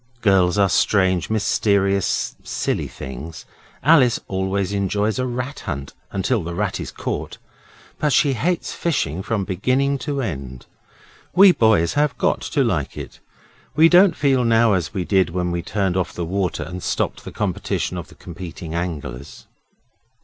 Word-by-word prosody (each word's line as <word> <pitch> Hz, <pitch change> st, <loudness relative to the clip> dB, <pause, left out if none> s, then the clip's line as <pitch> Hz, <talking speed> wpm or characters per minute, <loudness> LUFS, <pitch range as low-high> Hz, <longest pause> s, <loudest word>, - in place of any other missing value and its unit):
Girls 95 Hz, -3 st, +3 dB
are 100 Hz, -1 st, +4 dB
strange, 95 Hz, -1 st, +2 dB
mysterious, 100 Hz, -2 st, +1 dB
silly -, -, -2 dB
things. 70 Hz, +5 st, -8 dB, 0.4 s
Alice 135 Hz, -5 st, +5 dB
always 95 Hz, +1 st, -1 dB
enjoys 100 Hz, +3 st, 0 dB
a 130 Hz, -, 0 dB
rat 125 Hz, +4 st, -4 dB
hunt 70 Hz, -1 st, -5 dB, 0.2 s
until 100 Hz, +4 st, 0 dB
the 85 Hz, +1 st, -5 dB
rat -, -, -1 dB
is -, -, -5 dB
caught, -, -, -4 dB, 0.6 s
but 150 Hz, -, +1 dB
she 140 Hz, 0 st, +3 dB
hates 170 Hz, +7 st, -1 dB
fishing 95 Hz, -, -1 dB
from 105 Hz, 0 st, -1 dB
beginning 130 Hz, +9 st, 0 dB
to 140 Hz, +1 st, -3 dB
end. 70 Hz, -, -5 dB, 0.7 s
We 190 Hz, +1 st, +8 dB
boys 110 Hz, -, +3 dB
have 145 Hz, 0 st, +1 dB
got -, -, +1 dB
to -, -, 0 dB
like -, -, -1 dB
it. -, -, -8 dB, 0.6 s
We 160 Hz, +2 st, +6 dB
don't 180 Hz, 0 st, +6 dB
feel 135 Hz, -3 st, +2 dB
now 115 Hz, -1 st, +4 dB
as 90 Hz, -4 st, -1 dB
we 95 Hz, -4 st, -3 dB
did 95 Hz, -3 st, +2 dB
when 90 Hz, +1 st, -2 dB
we 85 Hz, 0 st, -2 dB
turned 95 Hz, 0 st, -1 dB
off 95 Hz, -2 st, -1 dB
the 85 Hz, -, -3 dB
water 95 Hz, +1 st, -1 dB
and 90 Hz, +1 st, -7 dB
stopped -, -, -2 dB
the -, -, -8 dB
competition -, -, -2 dB
of -, -, -6 dB
the -, -, -17 dB
competing 85 Hz, -2 st, -8 dB
anglers. 75 Hz, -6 st, -5 dB
100 Hz, 155 wpm, -21 LUFS, 90-125 Hz, 0.7 s, We